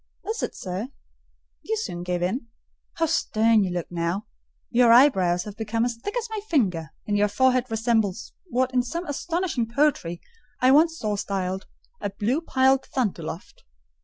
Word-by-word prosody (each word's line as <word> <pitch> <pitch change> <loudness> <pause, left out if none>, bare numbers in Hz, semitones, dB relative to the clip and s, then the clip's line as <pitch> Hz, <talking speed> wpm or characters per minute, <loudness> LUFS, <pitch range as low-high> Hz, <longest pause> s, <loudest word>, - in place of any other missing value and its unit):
"Is 445 +2 -2
it, - - -3
sir? 185 +5 -4 0.7
You 445 - -2
soon 175 - -4
give 175 0 -2
in. 230 +7 -2 0.5
How 330 - +1
stern 225 -8 +3
you 190 - -1
look 175 -1 -2
now! 175 +4 -2 0.5
Your 240 -1 +5
eyebrows 190 -9 +5
have 210 -1 -8
become 225 +1 -1
as 240 -1 -2
thick 410 - -5
as 475 -1 -2
my 435 - -2
finger, 180 - +1 0.2
and 205 -1 0
your 210 - +4
forehead 255 +4 +2
resembles 225 -3 0
what, 255 -3 0
in 250 - +4
some 335 +8 -4
very 310 - -4
astonishing 330 -5 -1
poetry, 235 - +1 0.4
I 255 +1 +5
once 320 +3 +5
saw 210 -5 -2
styled, 190 -1 -3 0.3
'a - - -1
blue 215 +9 -1
piled 265 -3 +2
thunderloft. 180 - -4
230 Hz, 165 wpm, -25 LUFS, 190-270 Hz, 0.7 s, Your